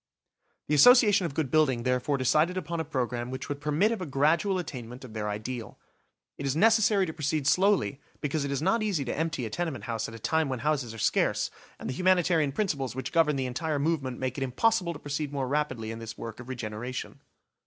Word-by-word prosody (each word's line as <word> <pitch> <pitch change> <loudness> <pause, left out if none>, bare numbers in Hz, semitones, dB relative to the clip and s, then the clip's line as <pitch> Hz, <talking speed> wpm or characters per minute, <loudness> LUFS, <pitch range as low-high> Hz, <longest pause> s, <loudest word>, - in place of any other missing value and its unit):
The - - 0
Association 205 - +6
of 140 - -9
Good 150 -6 -1
Building 135 -7 +3
therefore 125 +3 +1
decided 150 +8 +2
upon 170 -2 -3
a - - 0
programme 125 -5 -2
which 130 0 -5
would 145 0 -4
permit 150 +9 +2
of 230 - -3
a 180 - -4
gradual 160 +8 +2
attainment 125 -7 -6
of 115 - -11
their 105 -1 -3
ideal. 110 +3 -5 0.6
It 140 - -2
is 135 - 0
necessary 215 +1 +4
to 160 - -5
proceed 150 -1 -1
slowly 180 - +2 0.2
because 150 0 -1
it 140 - -2
is 140 +2 -1
not 195 +6 +2
easy 195 -10 0
to - - -3
empty 155 -6 -2
a 110 - -6
tenement 165 -2 -3
house 115 -2 -3
at 115 - -9
a - - -7
time 160 +6 0
when 130 -3 -3
houses 145 -6 0
are - - -9
scarce, - - +1 0.3
and - - -7
the - - -2
humanitarian 175 -3 +3
principles 140 - -2
which 130 -1 -4
govern 160 -3 +3
the 135 -1 -1
entire 150 +4 -2
movement 140 -4 -1
make 130 +1 -3
it - - -1
impossible 175 - +1
to - - -8
proceed 145 0 -4
more 135 -2 -2
rapidly 130 -6 -1
in 115 - -6
this 110 -1 -8
work 115 -1 -7
of 125 0 -10
regeneration. 120 0 -5
145 Hz, 215 wpm, -28 LUFS, 125-165 Hz, 0.6 s, Association